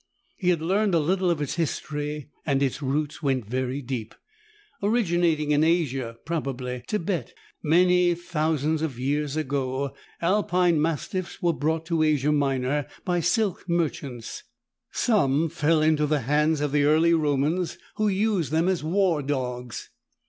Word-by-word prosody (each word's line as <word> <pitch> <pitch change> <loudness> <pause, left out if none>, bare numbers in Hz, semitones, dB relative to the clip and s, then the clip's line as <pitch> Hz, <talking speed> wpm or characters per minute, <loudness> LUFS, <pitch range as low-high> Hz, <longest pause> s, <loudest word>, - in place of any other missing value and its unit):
He 180 - 0
had 170 -3 +1
learned 195 +2 +2
a - - +4
little 180 +4 +1
of 160 -4 0
its 145 - -4
history, 150 -2 -3
and 140 -2 +1
its 135 +2 -1
roots 145 +3 -2
went 135 -6 0
very 130 +4 -2
deep. 120 -4 -5 0.7
Originating 175 -8 +1
in 150 +1 +4
Asia, 135 -8 0
probably 130 -6 -3
Tibet, 195 -3 -2 0.3
many 180 +2 +4
thousands 155 -2 -1
of 150 -6 -2
years 145 +3 -1
ago, 135 -2 -2 0.3
Alpine 180 -3 +2
Mastiffs 165 +3 -2
were 170 -1 +3
brought 160 +2 -1
to 165 -1 0
Asia 150 -2 +2
Minor 140 -1 0 0.2
by 175 -2 +1
silk 185 +1 0
merchants. 140 -8 -2 0.5
Some 165 - +2
fell 155 -1 +2
into 155 -1 +3
the 150 -1 +1
hands 150 +4 +2
of 150 -1 0
the 145 0 +3
early 160 +3 +4
Romans, 155 +3 +1 0.2
who 215 - +2
used 195 - +1
them 160 +3 +2
as 185 -4 0
war 175 -1 +2
dogs. 125 -4 -4
155 Hz, 145 wpm, -25 LUFS, 140-175 Hz, 0.7 s, a